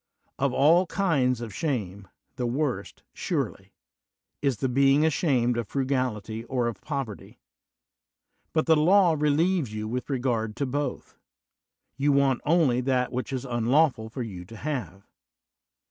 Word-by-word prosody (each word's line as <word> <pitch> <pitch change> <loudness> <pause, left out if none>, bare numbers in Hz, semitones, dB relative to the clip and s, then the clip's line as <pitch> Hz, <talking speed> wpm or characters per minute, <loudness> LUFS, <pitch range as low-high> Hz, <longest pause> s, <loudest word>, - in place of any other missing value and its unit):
Of 140 0 +1
all 165 +8 +4
kinds 145 - +1
of 115 -4 -6
shame, 100 - -3 0.3
the 125 - -2
worst, 135 +2 -3
surely, - - -3 0.7
is 135 -5 +1
the 130 - -1
being 135 +3 +4
ashamed 130 -7 +1
of 115 -3 -2
frugality 130 -5 -2
or 125 -1 -1
of 115 -4 -4
poverty; 135 -9 -6 1.1
but 155 - +1
the 160 - +5
law 175 +2 +4
relieves 150 - +1
you 110 0 -4
with 125 +4 -4
regard 120 -5 -1
to 140 - -1
both; 145 +3 -4 0.8
you 145 +1 +2
want 140 -2 +2
only 150 -6 +3
that 125 -1 0
which 130 +2 -4
it - - -1
is 130 +1 -4
unlawful 120 0 +1
for 125 +2 -5
you 95 -6 -7
to 115 +5 -11
have. 105 - -4
130 Hz, 145 wpm, -26 LUFS, 120-145 Hz, 1.1 s, the